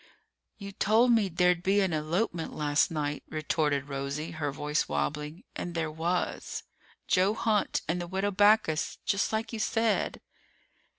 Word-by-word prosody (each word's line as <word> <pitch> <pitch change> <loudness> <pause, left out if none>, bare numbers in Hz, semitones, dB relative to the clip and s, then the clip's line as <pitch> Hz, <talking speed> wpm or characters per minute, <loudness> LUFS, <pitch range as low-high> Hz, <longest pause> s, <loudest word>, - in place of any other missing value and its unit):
"You 200 -2 -7
told 220 +5 +3
me 220 -4 +3
there'd 180 0 +2
be 195 +3 +2
an 190 -3 +1
elopement 165 +3 -1
last 145 -1 +2
night," 150 -2 -2
retorted 150 -2 0
Rosie, 140 +3 -4
her 155 -3 -2
voice 150 +2 -1
wobbling, 150 +3 -3
"and 175 -1 -5
there 160 -2 -1
was. 170 +3 -2 0.4
Joe 195 +3 +3
Hunt 225 -3 +1
and 175 +3 -1
the 175 - -5
Widow 190 +3 -1
Backus. 205 -5 +3
Just 200 - +1
like 220 +2 -2
you 225 - -3
said!" 225 0 0
175 Hz, 145 wpm, -29 LUFS, 150-205 Hz, 0.4 s, told